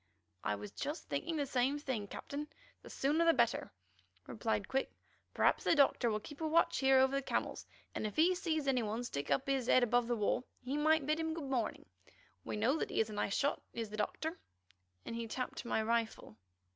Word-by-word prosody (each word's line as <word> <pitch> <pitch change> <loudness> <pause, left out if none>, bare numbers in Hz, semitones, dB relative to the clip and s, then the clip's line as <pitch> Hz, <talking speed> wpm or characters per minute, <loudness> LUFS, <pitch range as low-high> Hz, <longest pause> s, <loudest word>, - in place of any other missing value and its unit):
"I 105 - 0
was 105 0 -8
just 295 +4 -5
thinking 325 -1 -2
the 290 - 0
same 265 +2 +1
thing, 260 -8 -3
Captain; 290 +7 -6 0.3
the - - -12
sooner 295 +5 +1
the 330 -1 +5
better," 235 -2 +1 0.5
replied 105 -1 -2
Quick. 270 0 0 0.5
"Perhaps - - +3
the - - +4
Doctor 275 -4 +4
will 215 -1 0
keep 295 +8 -11
a 320 - 0
watch 330 +2 +3
here 270 0 +5
over 265 +1 +4
the 275 - +1
camels, - - -2 0.3
and 215 - -2
if 210 - -7
he 340 +4 +5
sees 320 -5 -1
any 255 -2 +3
one 220 +2 -2
stick 145 -12 -4
up 140 -1 +2
his 270 -3 0
head 255 - +5
above 245 0 +2
the 240 - +1
wall, 220 +3 +1 0.2
he 260 +3 -2
might 310 0 +3
bid 305 +2 +1
him 320 0 -1
good 285 -5 -5
morning. 235 -5 -1 0.6
We - - -4
know 255 +9 +2
he - - -1
is 220 -1 +1
a - - -6
nice 205 -1 -1
shot, 285 +1 +1
is 225 -3 -4
the 215 - -5
Doctor," 320 - -2 0.7
and - - -5
he 230 0 -3
tapped 255 +3 -4
my 220 -2 0
rifle. 225 - -1
260 Hz, 210 wpm, -35 LUFS, 225-295 Hz, 0.7 s, the